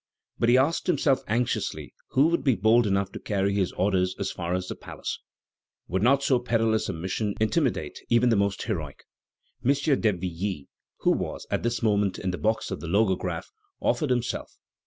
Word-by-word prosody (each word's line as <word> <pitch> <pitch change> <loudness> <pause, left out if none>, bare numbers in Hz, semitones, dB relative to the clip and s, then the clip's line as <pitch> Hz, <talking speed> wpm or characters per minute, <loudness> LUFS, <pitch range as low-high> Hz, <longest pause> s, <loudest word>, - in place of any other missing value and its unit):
But 115 - +3
he 125 - +6
asked 145 +6 +1
himself 145 -5 +2
anxiously 120 +2 -1 0.2
who 135 - +4
would 170 - 0
be 130 -5 +3
bold 110 +4 +4
enough 100 -1 0
to - - -7
carry 100 -1 0
his 95 -3 +1
order 95 0 +1 0.2
as 100 -1 -2
far 85 0 -2
as 90 0 -3
the - - -3
palace. - - -6 0.7
Would 95 +1 0
not 135 +5 +4
so 130 -3 +3
perilous 115 -3 +1
a - - -1
mission 95 +5 -2
intimidate 125 +5 0
even 120 +1 +4
the 115 - +4
most 100 -1 0
heroic? 80 - -4 0.6
M. 130 - +4
d'Hervilly, 95 - -1 0.3
who - - +4
was - - -2
at - - 0
this 120 0 -1
moment 105 -3 +2
in 95 - -2
the 90 - -5
box 110 +1 0
of - - -3
the 85 - -7
Logograph, 95 +1 0 0.3
offered 150 -4 0
himself. 120 -1 -2
110 Hz, 180 wpm, -26 LUFS, 95-120 Hz, 0.7 s, he